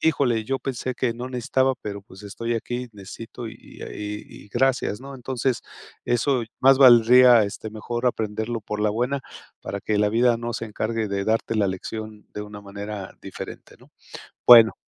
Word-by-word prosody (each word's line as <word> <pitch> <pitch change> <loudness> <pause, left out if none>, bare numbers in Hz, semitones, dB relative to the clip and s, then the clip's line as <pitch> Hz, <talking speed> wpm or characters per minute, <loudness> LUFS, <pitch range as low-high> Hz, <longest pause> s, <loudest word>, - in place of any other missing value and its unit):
"Híjole, 130 -8 +2
yo 135 +4 -1
pensé 130 -1 -3
que 120 -1 0
no 125 +2 -6
necesitaba, 130 +1 +1
pero, 100 -1 -5
pues, 95 +1 -15
estoy 115 +3 -3
aquí 120 +2 -3
y - - -13
necesito, 110 +4 -9
y 110 - -9
y - - -14
y 105 0 -7
y 105 - -19
gracias", 125 -2 +1
¿no? 135 +1 -9
Entonces, 130 -1 -2 0.4
eso 120 +1 +1 0.2
más 135 +1 +7
valdría, 125 -1 +8
este, 105 +2 -6
mejor 120 +3 -3
aprenderlo 110 0 -1
por 105 0 -5
la 105 - +2
buena 125 +6 -1 0.4
para 100 0 -5
que 105 +1 0
la 105 - +3
vida 120 +1 +3
no 120 0 -4
se 115 - -4
encargue 110 +1 -2
de 100 0 -2
darte 115 +1 0
la 100 -2 +3
lección 105 +3 -6
de 105 - -4
una 105 0 -9
manera 100 0 -7
diferente, - - -9
¿no? - - -21 0.6
Bueno. 115 -2 +9
115 Hz, 180 wpm, -24 LUFS, 105-125 Hz, 0.6 s, Bueno